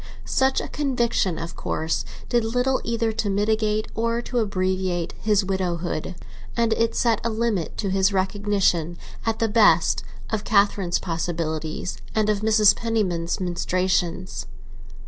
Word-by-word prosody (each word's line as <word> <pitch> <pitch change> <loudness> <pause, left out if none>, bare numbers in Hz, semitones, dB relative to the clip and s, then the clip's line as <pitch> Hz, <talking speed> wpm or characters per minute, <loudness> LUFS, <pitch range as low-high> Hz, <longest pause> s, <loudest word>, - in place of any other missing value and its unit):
Such 265 0 +2
a - - -4
conviction, 235 - 0
of 170 +1 -6
course, 160 +1 -2 0.2
did 240 -1 +2
little 250 +3 +1
either 230 -1 0
to 220 -1 -2
mitigate 215 +1 +1
or 230 +1 0
to 245 - -1
abbreviate 185 -4 -1
his 210 -2 +2
widowhood; 180 -2 -2 0.4
and 230 -1 +3
it 230 +1 0
set 230 -2 +2
a 230 - 0
limit 220 -6 -1
to 200 -3 -1
his 190 +1 +3
recognition, 190 -3 +1 0.3
at 225 -1 +1
the 225 - +1
best, 220 0 +4 0.3
of 215 -2 -1
Catherine's 200 -3 +2
possibilities 165 -1 -3 0.2
and 215 -1 +3
of 205 - 0
Mrs. 215 -1 +5
Penniman's 195 -7 -1
ministrations. 185 0 -1
205 Hz, 135 wpm, -24 LUFS, 180-225 Hz, 0.4 s, Mrs